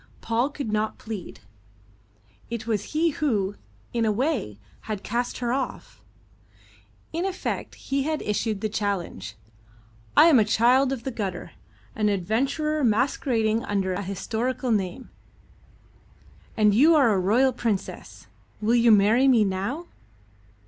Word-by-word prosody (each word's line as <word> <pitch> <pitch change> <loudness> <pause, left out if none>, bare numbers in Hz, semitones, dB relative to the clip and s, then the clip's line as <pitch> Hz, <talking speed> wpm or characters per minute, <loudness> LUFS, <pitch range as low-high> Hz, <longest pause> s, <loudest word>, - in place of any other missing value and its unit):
Paul 235 +4 0
could 280 -6 -5
not 215 0 -1
plead. 215 -5 -8 1.1
It 230 -1 -5
was 215 -3 -1
he 325 +2 +2
who, 215 -11 0 0.4
in 235 -1 0
a 220 - +2
way, 230 - -1 0.3
had 210 -2 -3
cast 240 +2 -2
her 240 -1 -1
off. 265 0 -5 1.1
In 335 +2 -1
effect 380 -1 -3
he 275 0 -2
had 310 +2 -2
issued 210 0 -1
the 215 - 0
challenge: 200 - -3 0.8
"I - - +9
am 315 -7 +6
a - - +5
child 245 +5 +3
of 260 -4 -4
the 265 - -3
gutter, 195 -6 -5 0.4
an 215 -1 +1
adventurer 275 - 0
masquerading 230 -1 +1
under 195 -2 -1
an 195 +2 -4
historical 230 +6 -2
name, 215 +4 -2 1.5
and 210 -1 +4
you 300 +10 +6
are 265 -8 +5
a 195 - +1
royal 240 +8 +3
princess. 225 -5 -4 0.3
Will 220 +2 +1
you 235 -1 +4
marry 215 +6 +5
me 240 -5 +5
now?" 200 - -2
230 Hz, 135 wpm, -25 LUFS, 205-265 Hz, 1.5 s, I